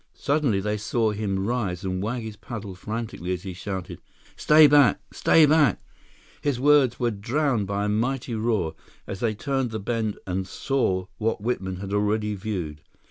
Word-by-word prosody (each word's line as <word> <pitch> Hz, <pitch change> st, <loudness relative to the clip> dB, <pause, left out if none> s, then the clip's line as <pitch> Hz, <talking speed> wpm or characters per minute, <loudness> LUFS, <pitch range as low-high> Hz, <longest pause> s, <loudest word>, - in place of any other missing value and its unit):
Suddenly 140 Hz, -9 st, +1 dB
they 105 Hz, +1 st, -1 dB
saw 110 Hz, +1 st, 0 dB
him 100 Hz, -2 st, -2 dB
rise 105 Hz, -6 st, -2 dB
and 95 Hz, -1 st, -2 dB
wag 115 Hz, +3 st, -2 dB
his 110 Hz, -1 st, -7 dB
paddle 105 Hz, -2 st, -7 dB
frantically 110 Hz, -2 st, -4 dB
as 90 Hz, -, -5 dB
he 95 Hz, -2 st, -5 dB
shouted: 95 Hz, 0 st, -6 dB, 0.4 s
"Stay 155 Hz, 0 st, +6 dB
back—stay 145 Hz, +2 st, +4 dB
back—" 150 Hz, -, +4 dB, 0.6 s
His 140 Hz, -4 st, 0 dB
words 140 Hz, -3 st, +4 dB
were 120 Hz, -2 st, +1 dB
drowned 115 Hz, +1 st, 0 dB
by 100 Hz, +1 st, -1 dB
a -, -, 0 dB
mighty 120 Hz, +3 st, -1 dB
roar 110 Hz, -7 st, 0 dB, 0.3 s
as 95 Hz, -, -6 dB
they 110 Hz, -1 st, 0 dB
turned 135 Hz, +3 st, -1 dB
the 110 Hz, -1 st, -4 dB
bend 110 Hz, 0 st, -2 dB
and 95 Hz, 0 st, -2 dB
saw 95 Hz, -5 st, 0 dB
what 115 Hz, 0 st, 0 dB
Whitman 95 Hz, -5 st, -2 dB
had 100 Hz, 0 st, -5 dB
already 105 Hz, +1 st, +1 dB
viewed. 90 Hz, -7 st, -4 dB
110 Hz, 165 wpm, -25 LUFS, 95-125 Hz, 0.6 s, Stay